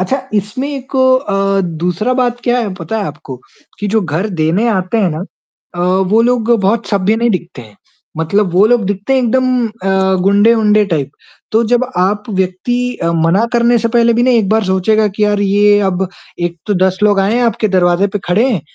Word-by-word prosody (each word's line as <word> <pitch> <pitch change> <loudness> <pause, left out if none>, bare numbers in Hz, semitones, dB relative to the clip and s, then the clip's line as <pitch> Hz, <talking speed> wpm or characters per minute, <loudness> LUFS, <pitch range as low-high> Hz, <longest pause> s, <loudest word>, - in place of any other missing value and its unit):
अच्छा 260 +9 -1
इसमें 210 +7 -2
एक 275 -1 -6
अ, 200 -7 +1 0.2
दूसरा 180 +8 -1
बात 245 -1 -1
क्या 245 0 +1
है 220 -5 -2
पता 175 +6 -5
है 210 - -2
आपको? 140 -2 -8 0.4
कि 205 - -2
जो 220 +2 +1
घर 175 +5 -2
देने 175 +9 +1
आते 190 0 -1
हैं 190 -6 +1
ना 160 +5 -5 0.5
अ, - - -3 0.3
वो 225 +2 +4
लोग 240 -1 0
बहुत 210 +4 0
सभ्य 200 +1 +1
नहीं 235 +1 +1
दिखते 175 - -5
हैं, 105 -2 -17 0.4
मतलब 180 +4 0
वो 190 +3 +5
लोग 240 -1 +2
दिखते 205 +6 -2
हैं 260 - +3
एकदम 255 0 +1
अ, 190 -3 -1
गुंडे-उंडे 210 +1 +3
टाइप। 150 -7 -2 0.4
तो 225 +2 +3
जब 245 +1 +3
आप 205 +3 0
व्यक्ति 215 +7 -2 0.2
मना 165 +6 +2
करने 235 0 +3
से 230 +1 -1
पहले 235 0 +3
भी 240 - +1
ना 255 - +3
एक 225 -6 +2
बार 220 0 +1
सोचेगा 195 +3 +1
कि 210 - +1
यार 205 -1 0
ये 205 +1 +3
अब 185 +1 -2 0.3
एक 175 0 -2
तो 205 - 0
10 190 0 0
लोग 205 -1 +3
आए 200 +4 +1
हैं 245 - +1
आपके 230 -2 0
दरवाजे 180 0 +2
पर - - 0
खड़े 215 +9 +2
हैं 205 -9 -1
210 Hz, 200 wpm, -14 LUFS, 190-235 Hz, 0.5 s, वो